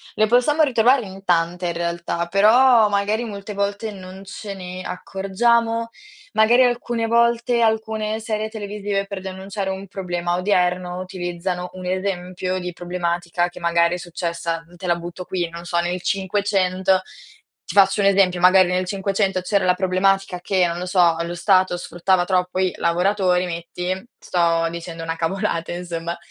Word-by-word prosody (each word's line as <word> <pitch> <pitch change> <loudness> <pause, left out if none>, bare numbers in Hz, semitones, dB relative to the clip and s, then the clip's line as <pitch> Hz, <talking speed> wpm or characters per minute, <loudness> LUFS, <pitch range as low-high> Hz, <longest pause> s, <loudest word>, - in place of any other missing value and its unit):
Le 215 - +3
possiamo 250 +7 +3
ritrovare 250 -2 +3
in 195 0 -11
tante, 175 0 +1
in 170 - -1
realtà, 170 0 -2
però 220 +5 +5
magari 205 +3 0
molte 205 -1 -7
volte 200 +2 -2
non 190 -1 -10
ce 200 +1 -7
ne, 185 -1 -7
accorgiamo? 230 +5 0 0.4
Magari 235 +4 +5
alcune 240 -1 0
volte 235 +1 +2
alcune 220 -1 0
serie 215 -1 -2
televisive 205 -2 -3
per 200 -1 -5
denunciare 190 +1 -5
un 190 +1 -5
problema 175 -2 -2
odierno 180 -1 0
utilizzano 180 0 -4
un 185 0 -8
esempio 185 0 -2
di 180 0 -4
problematica 175 0 -2
che 175 - -12
magari 170 0 +2
è - - -4
successa, 170 -1 -4
te 180 +1 -6
la 175 - +3
butto 175 +1 -7
qui, 175 -2 -2
non 170 +1 -9
so 175 0 -2
nel 175 +1 -2
500. 190 -1 +1 0.7
Ti - - -6
faccio 195 +1 +5
un 195 - +4
esempio, 190 -3 +3
magari 185 0 +6
nel 180 +1 0
500 195 0 0
c'era 200 +2 +1
la 180 0 +3
problematica 190 0 +1
che, 185 -1 +2
non 170 0 -3
lo 180 - -4
so, 180 -2 +3
lo 170 +1 -4
stato 185 0 +3
sfruttava 175 +1 0
troppo 180 0 0
i 185 -1 +1
lavoratori, 180 +1 +1
metti, 175 +1 -4 0.3
sto 170 -1 +1
dicendo 170 0 -7
una 165 0 -3
cavolata 170 0 -2
insomma, 170 -1 -4
185 Hz, 155 wpm, -21 LUFS, 175-200 Hz, 0.7 s, magari